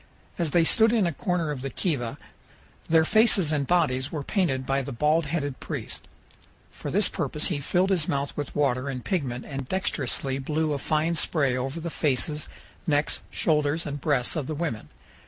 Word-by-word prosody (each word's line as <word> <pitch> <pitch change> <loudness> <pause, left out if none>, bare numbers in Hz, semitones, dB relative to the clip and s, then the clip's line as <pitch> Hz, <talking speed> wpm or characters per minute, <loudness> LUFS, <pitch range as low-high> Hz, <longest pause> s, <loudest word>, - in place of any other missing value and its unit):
As 170 -2 +1
they 170 +3 +4
stood 220 +6 +5
in 220 -5 +3
a 170 - 0
corner 170 0 -1
of 140 -3 -5
the 135 - -3
kiva 130 -6 -2 0.7
their 160 0 +5
faces 210 -5 +4
and 145 -3 0
bodies 145 -6 +1
were 150 -3 -3
painted 140 -8 0
by 135 +1 +1
the 135 - -6
bald 150 +5 +2
headed 145 -3 -2
priest. - - -6 0.6
For - - -7
this - - +3
purpose 150 - -1
he 160 -6 -1
filled 180 +7 +1
his 175 -5 +1
mouth 140 0 -1
with 145 -2 -5
water 140 -2 +1
and 125 -3 -5
pigment 135 -10 -2
and 135 -2 -6
dexterously 140 -7 -1
blew 155 +2 0
a 140 - -2
fine 155 +4 +1
spray 145 -5 +1
over 135 +5 -3
the 170 0 -4
faces, 150 +1 +1 0.4
necks, 145 -1 +1
shoulders, 150 0 +1
and 145 -2 -5
breasts 135 -3 +1
of 150 -5 -2
the 155 - -3
women. 145 - -3
150 Hz, 185 wpm, -26 LUFS, 135-165 Hz, 0.7 s, stood